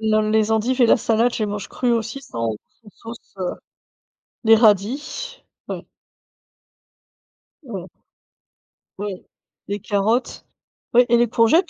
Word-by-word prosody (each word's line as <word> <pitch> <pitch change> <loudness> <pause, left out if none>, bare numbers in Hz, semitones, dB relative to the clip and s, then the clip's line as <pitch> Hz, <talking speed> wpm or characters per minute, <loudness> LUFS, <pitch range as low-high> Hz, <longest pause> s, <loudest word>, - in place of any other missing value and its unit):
Non, 215 -1 +2
les 220 0 +2
endives 235 +4 +1
et - - +7
la - - +6
salade, 230 +2 +2
je - - -4
les 215 - +1
mange 205 0 -5
crues 250 -1 0
aussi 230 +3 -2
sans 115 - -3 0.3
sans 210 - -15 0.2
sauce, - - -20
heu, 185 -1 -2 0.9
les 225 0 +8
radis 250 - +1 0.3
ouais. - - -5 1.8
Mmh. 200 - -7 1.1
Ouais. 200 -2 -5 0.4
Les 205 +1 -3
carottes. 210 +6 -1 0.5
Oui 245 +1 +6
et 235 - +5
les 240 0 +3
courgettes! 235 - +3
220 Hz, 135 wpm, -21 LUFS, 205-245 Hz, 1.8 s, les